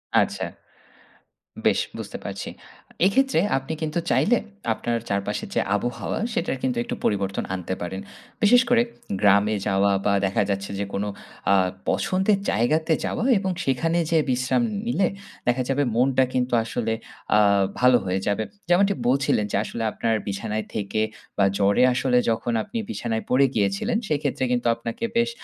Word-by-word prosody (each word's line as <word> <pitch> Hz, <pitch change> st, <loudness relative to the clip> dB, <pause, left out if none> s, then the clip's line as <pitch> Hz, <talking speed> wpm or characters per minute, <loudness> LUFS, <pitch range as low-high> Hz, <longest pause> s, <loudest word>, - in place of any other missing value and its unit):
আচ্ছা। -, -, +2 dB, 1.2 s
বেশ -, -, +4 dB, 0.2 s
বুঝতে -, -, -6 dB
পারছি। -, -, -5 dB, 0.6 s
এক্ষেত্রে 265 Hz, -1 st, +3 dB, 0.2 s
আপনি 135 Hz, +4 st, -4 dB
কিন্তু 155 Hz, +2 st, -1 dB
চাইলে 240 Hz, +2 st, +4 dB, 0.4 s
আপনার 120 Hz, +1 st, -2 dB
চারপাশের 100 Hz, 0 st, -2 dB
যে -, -, +3 dB
আবহাওয়া 120 Hz, +4 st, -2 dB
সেটার 230 Hz, -, -1 dB
কিন্তু 125 Hz, -2 st, 0 dB
একটু -, -, -4 dB
পরিবর্তন 100 Hz, -1 st, 0 dB
আনতে 95 Hz, 0 st, -3 dB
পারেন। 95 Hz, +2 st, -4 dB, 0.4 s
বিশেষ 245 Hz, +4 st, +7 dB
করে 240 Hz, -1 st, +5 dB, 0.4 s
গ্রামে 105 Hz, +1 st, +4 dB
যাওয়া 100 Hz, 0 st, +3 dB
বা 100 Hz, -, +3 dB
দেখা 95 Hz, -, +1 dB
যাচ্ছে 100 Hz, 0 st, -2 dB
যে 100 Hz, -, -1 dB
কোনো 100 Hz, +1 st, -1 dB, 0.4 s
আ -, -, +6 dB, 0.4 s
পছন্দের 190 Hz, +2 st, +1 dB
জায়গাতে 155 Hz, +8 st, +2 dB
যাওয়া 230 Hz, -, -2 dB
এবং 190 Hz, -1 st, -1 dB
সেখানে 165 Hz, +6 st, +1 dB
যে 165 Hz, -, +4 dB
বিশ্রাম 130 Hz, -, +1 dB, 0.2 s
নিলে 200 Hz, -5 st, +2 dB, 0.4 s
দেখা 125 Hz, +1 st, +2 dB
যাবে 140 Hz, +2 st, +2 dB
মনটা 130 Hz, +1 st, +3 dB
কিন্তু 125 Hz, 0 st, 0 dB
আসলে 115 Hz, -1 st, -2 dB, 0.4 s
আ -, -, +6 dB, 0.4 s
ভালো 125 Hz, 0 st, +6 dB
হয়ে 95 Hz, +1 st, 0 dB
যাবে। 105 Hz, +2 st, +1 dB, 0.3 s
যেমনটি 195 Hz, +3 st, +4 dB
বলছিলেন 130 Hz, -5 st, +2 dB
যে -, -, +1 dB
আসলে 115 Hz, -, -4 dB
আপনার 115 Hz, +1 st, 0 dB
বিছানায় 105 Hz, +2 st, -3 dB
থেকে 105 Hz, +1 st, -1 dB, 0.4 s
বা 100 Hz, -, +4 dB
জ্বরে 100 Hz, +4 st, +3 dB
আসলে 125 Hz, 0 st, +2 dB
যখন 115 Hz, +1 st, -1 dB
আপনি 235 Hz, -, -6 dB
বিছানায় 115 Hz, -2 st, -2 dB
পড়ে 135 Hz, +2 st, +5 dB
গিয়েছিলেন 105 Hz, -, +1 dB
সেইক্ষেত্রে 145 Hz, -3 st, -1 dB
কিন্তু 120 Hz, -1 st, +1 dB
আপনাকে 115 Hz, -, -6 dB
বেশ 235 Hz, 0 st, +3 dB
120 Hz, 150 wpm, -24 LUFS, 105-160 Hz, 1.2 s, বিশেষ